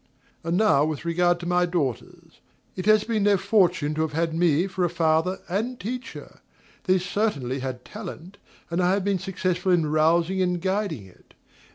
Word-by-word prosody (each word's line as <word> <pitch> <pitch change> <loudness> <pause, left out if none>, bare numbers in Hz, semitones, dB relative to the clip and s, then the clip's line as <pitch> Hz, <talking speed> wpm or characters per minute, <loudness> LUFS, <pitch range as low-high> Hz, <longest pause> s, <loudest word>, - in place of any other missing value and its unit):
And 170 +2 0
now 210 -10 +4
with 155 +1 -3
regard 175 +1 +2
to - - -6
my 180 0 +2
daughters. 145 -9 -4 0.4
It 185 +2 -5
has 215 -1 +5
been 225 -3 -1
their 205 -1 +4
fortune 185 -7 +2
to 155 - -2
have 160 -2 -2
had 165 +1 0
me 165 0 +2
for 185 -1 -3
a 175 - +2
father 165 +2 +1
and 225 +7 -2
teacher: 245 +6 -7 0.5
they 185 -1 +4
certainly 180 - -2
have 130 -1 -5
talent, 195 -2 -9 0.3
and 170 +2 0
I 180 +1 +3
have 200 -1 0
been 200 -1 0
successful 185 -1 -1
in 170 -3 +3
rousing 165 +4 +2
and 180 -1 0
guiding 190 - -2
it. 95 - -21
180 Hz, 180 wpm, -25 LUFS, 160-195 Hz, 0.5 s, has